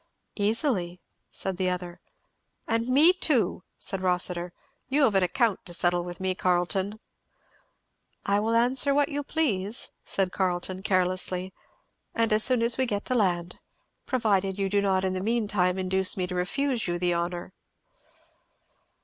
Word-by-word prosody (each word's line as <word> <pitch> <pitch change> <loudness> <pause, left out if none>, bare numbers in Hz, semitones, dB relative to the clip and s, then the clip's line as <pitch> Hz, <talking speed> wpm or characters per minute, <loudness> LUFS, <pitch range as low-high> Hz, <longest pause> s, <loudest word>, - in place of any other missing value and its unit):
"Easily," 205 - 0 0.3
said 190 -2 -4
the 185 -1 0
other. 180 -1 -5 0.7
"And 230 +1 0
me 295 +8 +6
too," 295 - +1 0.2
said 195 -1 -4
Rossitur. 180 -1 +1 0.4
"You 285 +2 +2
have 225 - +4
an 195 - +3
account 210 +3 +1
to 175 - -4
settle 175 0 +1
with 175 0 -8
me, 190 0 0
Carleton." 185 +3 0 1.3
"I 200 0 +2
will 225 +2 0
answer 255 +4 +2
what 290 +1 +2
you 290 -1 -2
please," 235 -9 -1
said 190 -2 0
Carleton 185 0 -2
carelessly, 185 -1 0 0.6
"and 230 -2 +2
as 215 0 +4
soon 250 -3 +3
as 235 +1 +3
we 260 - +2
get 205 -2 -2
to 255 - -1
land 180 -6 0 0.5
provided 200 -6 +1
you 195 -1 -1
do 200 +1 +2
not 190 -1 +1
in 185 - 0
the 185 - -3
mean 225 +1 0
time 180 -2 +1
induce 190 0 +2
me 185 - 0
to 180 - -6
refuse 235 +7 -1
you 175 0 -1
the 175 0 0
honour." 175 +1 -3
190 Hz, 160 wpm, -27 LUFS, 180-230 Hz, 1.3 s, me